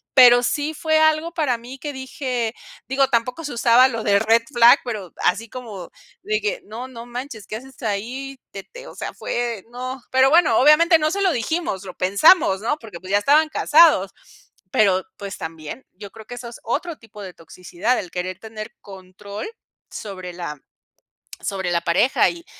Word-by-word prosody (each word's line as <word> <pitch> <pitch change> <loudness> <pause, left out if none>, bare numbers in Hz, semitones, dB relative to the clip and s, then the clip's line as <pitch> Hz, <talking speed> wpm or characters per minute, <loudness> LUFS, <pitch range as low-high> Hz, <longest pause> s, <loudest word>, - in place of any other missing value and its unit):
Pero 245 -2 +8
sí 295 +4 -1
fue 315 +1 +1
algo 315 +2 +2
para 290 -8 0
mí 250 +3 -11
que 295 0 -5
dije, 255 -3 -3 0.3
digo, 270 +1 +2
tampoco 250 +5 -1
se 290 - -4
usaba 240 +2 +5
lo 230 -3 -4
de 200 -1 +3
Red 225 +2 +3
Flag, 240 +2 +7
pero 210 -7 -5
así 220 +5 +1
como 220 -8 -8 0.3
de 430 +1 0
que 475 +4 -2
no, 235 +4 -7
no 235 -2 -10
manches. 240 -3 -7
¿Qué 215 - -5
haces 265 +3 -14
ahí?, 250 +6 -4
te 195 - -8
te - - -13
o - - -11
sea, - - -6
fue 235 -4 -3
no. 255 +1 -6
Pero 260 +1 +5
bueno 320 -8 +4
obviamente 320 +4 +6
no 305 - +1
se 400 - -2
lo 375 - +3
dijimos, 260 - -2
lo 185 - -9
pensamos, 195 - +4
¿no? 265 +7 -1
Porque 210 -7 -10
pues 185 - -12
ya 200 - +4
estaban 300 +8 +4
casados, 300 - +4 0.6
pero 190 -3 +3
pues 200 -2 -7
también 160 - -7
yo 200 +1 -11
creo 220 0 -13
que 245 - -7
eso 245 0 -8
es 235 - -12
otro 310 +7 -3
tipo 215 -2 -13
de 185 - -8
toxicidad, 180 +8 -3
el 180 - -7
querer 185 0 -4
tener 220 +2 -9
control 195 +1 -9 0.4
sobre 185 -4 -8
la 170 -4 -6 0.8
sobre 190 -3 -3
la 170 -1 +1
pareja, 170 +10 +3
y 340 0 -9
235 Hz, 185 wpm, -21 LUFS, 200-275 Hz, 0.8 s, Pero